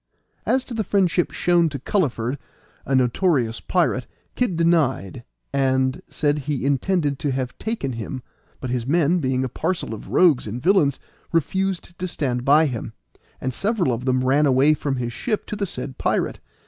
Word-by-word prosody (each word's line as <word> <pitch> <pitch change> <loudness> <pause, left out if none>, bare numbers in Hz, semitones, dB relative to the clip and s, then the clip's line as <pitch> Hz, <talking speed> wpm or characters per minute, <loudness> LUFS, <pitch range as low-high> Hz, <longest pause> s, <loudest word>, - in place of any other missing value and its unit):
As 260 0 +2
to 245 - -8
the 220 -1 -1
friendship 185 -3 +2
shown 175 -2 +2
to 140 - -5
Culliford, 135 - -1 0.5
a 135 - +1
notorious 125 -2 +2
pirate, 165 -9 0 0.3
Kid 245 -8 0
denied, 160 - +1 0.3
and 130 -1 +1
said 145 -1 0
he 140 -1 -3
intended 145 +1 +1
to 145 - -1
have 130 -1 -3
taken 220 - -2
him, 120 +3 -5 0.4
but 130 - -4
his 125 -1 -2
men, 170 +3 +3
being 130 -3 0
a - - 0
parcel 165 -1 -2
of 110 - -8
rogues 160 -11 +4
and 110 +4 -4
villains, 150 -3 +3 0.3
refused 175 +1 -1
to 185 - -2
stand 130 -7 -2
by 150 +4 +5
him, 115 -5 -4 0.5
and 130 0 -3
several 195 - 0
of 120 +2 -4
them 130 -1 +2
ran 145 +3 +4
away 135 +3 +5
from 145 -2 -2
his 120 -2 -3
ship 215 - -2
to - - -5
the 200 -1 -2
said 130 -3 -6
pirate. - - 0
140 Hz, 175 wpm, -23 LUFS, 130-175 Hz, 0.5 s, by